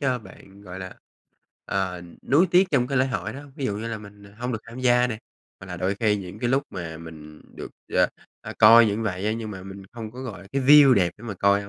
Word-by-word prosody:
cho 130 -3 0
bạn, 95 -1 -16
gọi 90 -1 -9
là, 95 -1 -8 0.7
ờ, 95 -2 -2 0.2
nuối 155 +8 +3
tiếc 180 +2 +4
trong 125 -4 +2
cái 135 0 0
lễ 130 - +3
hội 105 -5 -3
đó 135 - -8
hông? 145 -1 -15
Ví 140 - -4
dụ 100 - -2
như 110 +2 -5
là 115 -2 -4
mình, 105 0 -14
à, 100 - -17
hông 125 +1 -3
được 115 - -2
tham 115 +2 -10
gia 125 -1 +4
nè, 115 -3 -5 0.4
hoặc 95 - -10
là 90 -1 -6
đôi 95 +3 -1
khi 105 0 +1
những 95 -3 -8
cái 120 - -1
lúc 135 +2 +2
mà 80 -3 -6
mình 75 -2 -12 0.2
được, - - -8 0.2
ờ, - - +4 0.3
ờ, - - -8
coi 115 0 +8
như 105 +1 -1
vậy 100 -2 -3
á, 110 - +1
nhưng 110 -1 -5
mà 95 -3 -8
mình 95 +1 -10
không 115 -2 -7
có, 130 +2 -8
gọi 120 -6 -7
là, 95 - -16
cái 135 0 0
view 140 -1 +8
đẹp 90 -4 +2
để 110 - -14
mà 110 -3 -5
coi 100 +2 +2
hông? 100 - -10
110 Hz, 275 wpm, -24 LUFS, 95-125 Hz, 0.7 s, coi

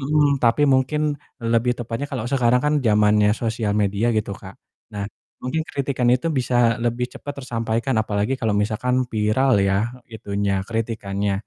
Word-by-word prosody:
Mhm, 145 0 +2
tapi 120 +4 +3
mungkin 135 +2 +2 0.4
lebih 115 +1 +1
tepatnya 120 +3 -4
kalau 125 -5 -3
sekarang 125 -2 +3
kan 150 +1 +2
zamannya 105 -2 +4
sosial 110 -1 -1
media 100 +2 +1
gitu 105 -1 -1
Kak. 95 0 -11 0.4
Nah 100 -1 -4 0.3
mungkin 155 +6 -2
kritikan 135 -3 -1
itu 125 +5 +2
bisa 125 0 -1 0.3
lebih 120 +1 0
cepat 145 - -7
tersampaikan 115 +1 -1
apalagi 105 +3 -1
kalau 110 -3 +1
misalkan 115 +4 -1
viral 115 +4 +2
ya, 95 0 +2 0.4
itunya, 100 -2 -2
kritikannya. 105 -3 -2
115 Hz, 145 wpm, -22 LUFS, 105-130 Hz, 0.4 s, zamannya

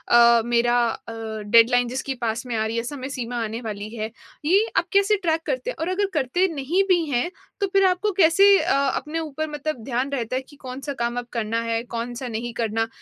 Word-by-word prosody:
अ, 235 -1 +6
मेरा 240 0 +2 0.3
अ, 230 - -5 0.3
डेडलाइन 235 +3 +5
जिसकी 265 +2 -3
पास 230 +1 -1
में 245 - -3
आ 220 - +1
रही 225 +1 -3
हैं, 230 - 0
समय 265 0 -5
सीमा 245 -3 -4
आने 225 +2 -4
वाली 210 -1 -5
है? 220 -1 -4 0.3
ये 380 +8 +4
आप - - +2
कैसे 400 +2 +4
ट्रैक 325 -2 +1
करते - - -2
हैं? - - -8
और 325 - -1
अगर 395 +2 +1
करते 300 +6 +2
नहीं 305 +7 +1
भी 350 -3 +3
हैं 250 +6 0 0.3
तो 400 - +2
फ़िर 390 -1 +4
आपको 375 +3 +1
कैसे 360 +2 +5
अ, 330 0 +1
अपने 300 +4 -2
ऊपर 315 -1 -3
मतलब 295 -3 -4
ध्यान 255 +2 -1
रहता 250 -2 -2
है 260 - -1
कि 290 - -16
कौन-सा 265 +3 -5
काम 240 +1 -1
अब 245 - -4
करना 230 -1 -1
है, 230 0 -1
कौन-सा 240 +2 -5
नहीं 235 +1 -4
करना? 225 +1 0
255 Hz, 215 wpm, -23 LUFS, 235-325 Hz, 0.3 s, अ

